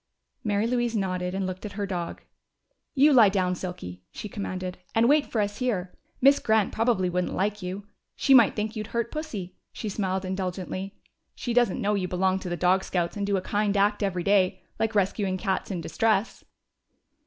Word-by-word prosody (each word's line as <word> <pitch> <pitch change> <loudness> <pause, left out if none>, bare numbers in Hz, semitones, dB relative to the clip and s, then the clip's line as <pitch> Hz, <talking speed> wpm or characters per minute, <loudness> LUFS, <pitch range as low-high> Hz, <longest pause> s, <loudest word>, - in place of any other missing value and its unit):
Mary 205 0 +1
Louise 240 -1 0
nodded 185 -2 -1
and 195 0 -1
looked 185 0 -5
at 210 - -6
her 200 0 -2
dog. 175 -3 -4 0.7
"You 285 +2 +6
lie 230 -6 +7
down, 185 -2 +1
Silky," 170 - -6
she - - -7
commanded, 185 -3 -5 0.2
"and 225 +1 +4
wait 295 +2 +4
here - - -19
for 220 - +1
us. 205 +3 -3 0.6
Miss 275 +2 +6
Grant 220 -2 +2
probably 225 -5 +2
wouldn't 180 0 -1
like 205 +2 -1
you. 185 +3 -5 0.3
She 275 - +3
might 240 -5 +7
think 215 +1 -2
you'd 215 -1 -4
hurt 235 0 -1
Pussy." 225 - -5 0.2
She 215 - -5
smiled 190 -2 -2
indulgently. 185 +1 -4 0.4
"She 240 - -3
doesn't 240 -5 +3
know 210 +1 +1
you 190 -3 0
belong 185 +1 +1
to 185 - -6
the 175 - -2
Dog 185 +2 +3
Scouts 175 -2 -1
and 200 -1 -2
do 200 -1 +2
a - - -1
kind 205 +1 0
act 205 +2 +2
every 185 -3 -1
day 195 -1 +2 0.2
like 225 0 0
rescuing 195 -1 +1
cats 190 -1 -2
in 185 -4 -3
distress!" 220 +4 0
200 Hz, 190 wpm, -26 LUFS, 185-220 Hz, 0.7 s, lie